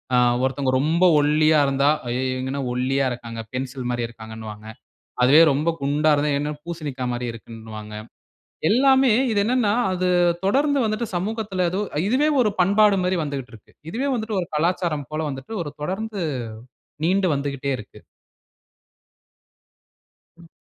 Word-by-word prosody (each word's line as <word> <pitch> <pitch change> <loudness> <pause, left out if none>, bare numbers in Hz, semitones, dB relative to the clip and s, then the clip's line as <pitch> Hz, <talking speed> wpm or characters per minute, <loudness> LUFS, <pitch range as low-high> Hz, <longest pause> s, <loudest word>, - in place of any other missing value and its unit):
அ - - +4 0.3
ஒருத்தங்க 130 0 0
ரொம்ப 165 +4 +1 0.2
ஒல்லியா 155 +1 +3
இருந்தா, 140 +1 +2 0.2
"அய்யோ 125 +2 -1
இவங்க 130 +1 -3
என்ன 140 - -3
ஒல்லியா 135 +2 0
இருக்காங்க." 115 -1 -8
'பென்சில் 130 -1 -4
மாதிரி' 120 -1 -2
இருக்கிறாங்கன்னுவாங்க. 110 -2 -10 0.6
அதுவே 140 +6 +7
ரொம்ப 150 +4 0
குண்டா 150 +2 +2
இருந்தா, 145 +1 0
"என்ன 150 +1 -2
பூசணிக்கா 150 -7 -5
மாதிரி 120 0 -3
இருக்குன்னுவாங்க." 110 -2 -10 0.7
எல்லாமே 265 +2 +4 0.2
இது 205 - +2
என்னனா, 235 -2 +2 0.2
அது 185 0 -1 0.4
தொடர்ந்து 280 +8 +2
வந்துட்டு 220 +2 -1
சமூகத்தில 200 -1 -2
எதோ 190 +3 -2 0.3
இதுவே 275 +6 +2
ஒரு 215 - +3
பண்பாடு 200 +2 +4
மாதிரி 180 0 0
வந்துக்கிட்டு 140 -4 -5
இருக்கு. 110 - -17 0.2
இதுவே 265 +7 -2
வந்துட்டு 220 -3 -2
ஒரு 175 - -4
கலாச்சாரம் 165 -3 0
போல 155 0 -2
வந்துட்டு, 135 +10 -8
ஒரு 145 - -7
தொடர்ந்து, 200 +4 -3 0.8
நீண்டு 190 +1 +2
வந்துகிட்டே 140 -1 -3
இருக்கு. - - -12 2.4
ம். 170 0 -16
150 Hz, 135 wpm, -23 LUFS, 130-195 Hz, 2.4 s, அதுவே